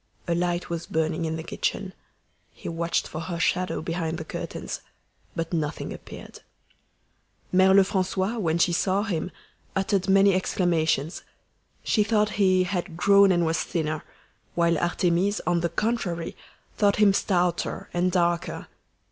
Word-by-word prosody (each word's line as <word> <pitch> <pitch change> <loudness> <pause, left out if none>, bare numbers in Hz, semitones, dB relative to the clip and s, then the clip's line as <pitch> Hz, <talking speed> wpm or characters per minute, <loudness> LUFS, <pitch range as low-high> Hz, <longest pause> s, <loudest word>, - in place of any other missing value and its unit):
A 170 - +1
light 175 0 -1
was 170 -1 -4
burning 160 +1 -1
in 160 0 -2
the 160 - -5
kitchen. - - -3 0.6
He - - -10
watched 170 0 -1
for 155 - -6
her 170 0 -4
shadow 180 0 0
behind 165 -1 -2
the 160 - -6
curtains, - - -5 0.5
but 165 +1 -3
nothing 155 -2 -2
appeared. - - -11 1.1
Mere 190 +1 +5
Lefrancois, 190 +2 +2
when 165 -4 +1
she 170 +1 +3
saw 190 +3 +1
him, 180 -5 -2 0.5
uttered 195 0 0
many 195 0 +6
exclamations. 170 -4 0 0.6
She 210 - +2
thought 210 -1 +2
he 185 -1 +4
"had 180 -2 -3
grown 200 +1 +6
and 175 -2 +2
was 160 0 +1
thinner," 155 -3 -2 0.5
while 170 -1 +3
Artémise, 175 +4 +1
on 175 -1 +2
the 170 - 0
contrary, 175 -3 -2 0.4
thought 200 -1 +3
him 210 -2 +5
stouter 180 -3 0
and 180 +1 +1
darker. 175 -1 0
175 Hz, 140 wpm, -25 LUFS, 165-195 Hz, 1.1 s, many